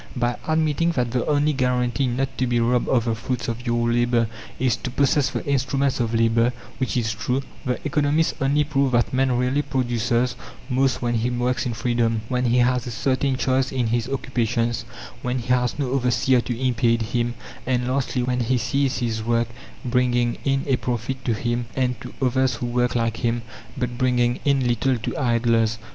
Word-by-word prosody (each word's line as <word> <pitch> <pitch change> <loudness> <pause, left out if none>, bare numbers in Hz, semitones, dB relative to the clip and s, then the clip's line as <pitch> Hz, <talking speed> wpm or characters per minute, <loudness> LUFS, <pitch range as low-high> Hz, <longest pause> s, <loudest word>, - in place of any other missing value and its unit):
By 120 -1 0
admitting 160 +1 +1
that 125 -5 0
the 125 0 -1
only 150 0 +2
guarantee 125 0 +1
not 130 +2 -2
to 130 - +1
be 120 0 +1
robbed 120 +1 +2
of 120 -3 +2
the 115 - +1
fruits 120 0 -3
of 120 +2 -4
your 120 0 +1
labour 120 -1 +2 0.3
is 125 -3 +2
to - - -5
possess 140 +2 +2
the - - -4
instruments 135 -1 0
of 115 -1 0
labour 115 +1 +3 0.3
which 130 -1 -1
is 115 -2 0
true 125 +4 -1 0.2
the 125 - 0
economists 150 +2 +2
only 140 +2 +3
prove 140 -3 0
that 120 +1 +2
man 130 -1 +2
really 125 +3 +1
produces 125 -2 0 0.4
most 130 0 +1
when 120 0 0
he 115 +1 +1
works 125 0 0
in 120 - -3
freedom, 115 0 0
when 125 -1 0
he 120 +1 +3
has 125 0 +2
a - - -4
certain 130 +3 0
choice 130 0 +1
in 130 -2 0
his 120 +1 0
occupations, 120 -3 -1 0.4
when 125 +1 -1
he 120 0 -6
has 125 0 +1
no 135 -4 -1
overseer 125 -1 +2
to 120 -1 -4
impede 115 -2 +2
him, 120 0 0 0.3
and 125 -1 +1
lastly, 130 -1 0
when 125 0 0
he 125 +2 +1
sees 135 +3 0
his 115 -3 -1
work 115 0 +1 0.4
bringing 120 -1 +1
in 135 0 +1
a 135 -3 +2
profit 125 +2 -3
to 115 - +1
him 120 +1 -2
and 125 -2 0
to - - -8
others 130 0 +2
who 120 - -4
work 125 0 0
like 115 -1 0
him, 120 -1 -1 0.3
but 125 -1 -3
bringing 125 -1 +2
in 140 -3 +2
little 120 +2 +1
to 110 - -4
idlers. 115 -3 +2
125 Hz, 190 wpm, -23 LUFS, 120-130 Hz, 0.4 s, labour